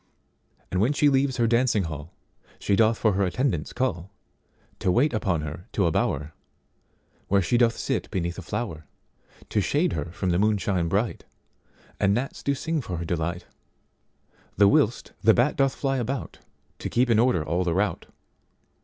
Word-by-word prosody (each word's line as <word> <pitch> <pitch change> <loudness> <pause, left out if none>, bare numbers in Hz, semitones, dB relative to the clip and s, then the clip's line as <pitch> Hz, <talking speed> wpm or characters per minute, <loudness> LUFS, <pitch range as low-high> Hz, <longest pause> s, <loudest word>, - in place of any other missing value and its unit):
And 95 - +1
when 125 +7 +2
she 145 0 +4
leaves 135 -1 +1
her 120 - +2
dancing 115 -2 +2
hallShe 80 +5 -5
doth 110 +1 +3
for 110 -3 +2
her 100 +1 +1
attendants 95 - -1
call, 100 -8 -2 0.7
To 90 - +1
wait 130 +9 +2
upon 95 -7 0
her 80 +4 -7
to 100 - +2
a 85 - +2
bower, 75 0 -1 0.9
Where 100 -1 +3
she 105 - 0
doth 120 -1 +3
sit - - -2
beneath 85 0 -3
a - - -6
flower, 90 -5 -5 0.6
To 105 - +1
shade 155 - +1
her - - -2
from 90 +2 -3
the 85 - +1
moonshine 100 -4 +1
bright; 100 +6 -1 0.8
And 100 0 +3
gnats 130 +4 -3
do 140 - 0
sing 160 +2 -2
for 90 -7 -5
her 85 - -4
delight. 85 +1 -2 1.1
The 100 +1 +6
whilst 105 +3 +2
the 110 +1 +6
bat 125 +5 +2
doth 135 -1 +1
fly 135 -1 -1
aboutTo 130 +3 -6
keep 120 0 +2
in 110 - +4
order 120 -9 +3
all 90 +2 0
the 85 -2 -1
rout. 105 +2 -1
105 Hz, 170 wpm, -25 LUFS, 85-125 Hz, 1.1 s, The